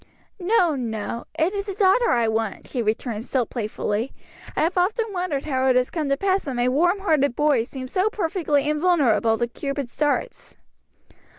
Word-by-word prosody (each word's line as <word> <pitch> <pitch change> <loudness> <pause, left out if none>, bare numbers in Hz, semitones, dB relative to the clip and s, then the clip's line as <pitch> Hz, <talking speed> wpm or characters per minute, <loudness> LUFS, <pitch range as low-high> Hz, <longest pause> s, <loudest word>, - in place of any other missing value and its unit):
"No, 360 -3 +3
no, 230 -2 -4
it 330 +5 +1
is 400 0 -3
a 390 - -5
daughter 415 +4 +4
I 235 -2 +2
want," 220 -2 -2
she 250 - -3
returned 220 0 -2
still 255 -1 0
playfully. 220 +1 -3 0.4
"I - - +1
have 335 +3 0
often 390 +6 +1
wondered 355 -7 -2
how 265 -3 0
it 255 - +4
has 250 0 +2
come 310 -4 -2
to 275 - +2
pass 390 +3 +1
that 270 -3 -3
my 245 +1 +1
warm 350 +9 +2
hearted 290 -9 +2
boy 290 -6 +2
seems 260 0 -8
so 380 +3 +2
perfectly 320 -7 0
invulnerable 300 -8 +2
to 240 - +1
Cupid's 275 +1 -5
darts." 300 +11 -1
285 Hz, 180 wpm, -23 LUFS, 240-360 Hz, 0.4 s, daughter